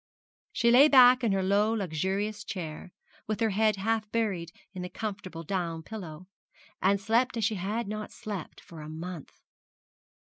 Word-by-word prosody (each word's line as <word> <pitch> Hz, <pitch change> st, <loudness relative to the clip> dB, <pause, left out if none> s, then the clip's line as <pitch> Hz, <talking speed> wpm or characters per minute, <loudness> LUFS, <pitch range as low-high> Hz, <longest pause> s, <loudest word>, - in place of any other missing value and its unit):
She 235 Hz, -, +2 dB
lay 265 Hz, +5 st, +8 dB
back 255 Hz, -3 st, +7 dB
in 225 Hz, -, +2 dB
her 195 Hz, -1 st, +1 dB
low 205 Hz, +3 st, +2 dB
luxurious 200 Hz, +2 st, -2 dB
chair, 180 Hz, -4 st, -6 dB, 0.4 s
with 215 Hz, 0 st, -2 dB
her 225 Hz, -2 st, +2 dB
head 215 Hz, +1 st, +2 dB
half 215 Hz, +2 st, -1 dB
buried 195 Hz, -8 st, -1 dB, 0.2 s
in 185 Hz, -, -6 dB
the 180 Hz, -, -5 dB
comfortable 195 Hz, -6 st, -6 dB
down 165 Hz, -2 st, -3 dB
pillow, 180 Hz, -5 st, -8 dB, 0.5 s
and 200 Hz, +1 st, +3 dB
slept 230 Hz, +4 st, +1 dB
as 225 Hz, -, +1 dB
she 220 Hz, -, +1 dB
had 205 Hz, +4 st, -3 dB
not 215 Hz, +1 st, -5 dB
slept 210 Hz, -7 st, -7 dB
for 165 Hz, -2 st, -12 dB
a 150 Hz, -, -8 dB
month. 165 Hz, 0 st, -8 dB
200 Hz, 165 wpm, -29 LUFS, 180-220 Hz, 0.5 s, lay